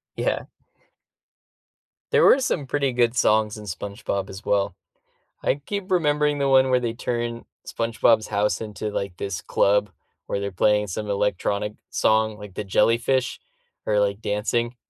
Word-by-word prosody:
Yeah. -, -, -1 dB, 1.7 s
There 460 Hz, +1 st, +5 dB
were -, -, +7 dB
some 155 Hz, -, -1 dB
pretty 140 Hz, -1 st, 0 dB
good 120 Hz, 0 st, +2 dB
songs 110 Hz, -1 st, +2 dB
in 105 Hz, -, -9 dB
SpongeBob 100 Hz, 0 st, -4 dB
as 95 Hz, +3 st, -10 dB
well. 100 Hz, -1 st, +1 dB, 0.7 s
I -, -, +1 dB
keep 195 Hz, +6 st, -5 dB
remembering 150 Hz, -4 st, +2 dB
the 140 Hz, -1 st, +1 dB
one 130 Hz, -1 st, +5 dB
where 125 Hz, -, +4 dB
they 120 Hz, -2 st, -2 dB
turned 120 Hz, -1 st, -3 dB, 0.2 s
SpongeBob's 115 Hz, -1 st, +1 dB
house 105 Hz, 0 st, 0 dB
into, 105 Hz, -1 st, -5 dB
like, 100 Hz, -3 st, -4 dB
this 95 Hz, -3 st, -4 dB
club, 105 Hz, 0 st, +2 dB, 0.4 s
where -, -, -1 dB
they're 100 Hz, 0 st, -3 dB
playing 105 Hz, +3 st, +2 dB
some 105 Hz, +2 st, -4 dB
electronic 100 Hz, +1 st, 0 dB, 0.2 s
song, 110 Hz, -1 st, +2 dB
like, 105 Hz, -3 st, -10 dB
the 105 Hz, -, -3 dB
jellyfish 120 Hz, +5 st, +1 dB, 0.5 s
are, 105 Hz, -1 st, +3 dB
like, 100 Hz, +1 st, 0 dB
dancing. 115 Hz, +4 st, -1 dB
110 Hz, 150 wpm, -24 LUFS, 105-125 Hz, 1.7 s, were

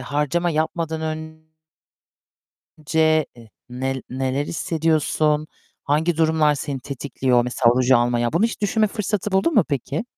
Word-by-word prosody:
harcama 150 Hz, +6 st, -1 dB
yapmadan 160 Hz, 0 st, -2 dB
ön 160 Hz, 0 st, -6 dB, 1.4 s
ce, 155 Hz, -1 st, +3 dB
e 115 Hz, -2 st, -15 dB, 0.2 s
nel 130 Hz, +1 st, -3 dB
neler 130 Hz, +2 st, -2 dB
hissediyorsun? 155 Hz, -2 st, 0 dB, 0.4 s
Hangi 155 Hz, +4 st, +1 dB
durumlar 160 Hz, -2 st, +3 dB
seni 140 Hz, 0 st, -4 dB
tetikliyor? 130 Hz, -2 st, 0 dB
Mesela 120 Hz, -1 st, +2 dB
ruj 130 Hz, 0 st, +2 dB
almaya. 120 Hz, 0 st, +2 dB
Bunu 170 Hz, -, +2 dB
hiç 230 Hz, -1 st, -1 dB
düşünme 215 Hz, +1 st, +2 dB
fırsatı 210 Hz, -1 st, -3 dB
buldun 195 Hz, +13 st, +2 dB
mu 215 Hz, -, +6 dB
peki? 140 Hz, -, -2 dB
155 Hz, 130 wpm, -22 LUFS, 130-165 Hz, 1.4 s, mu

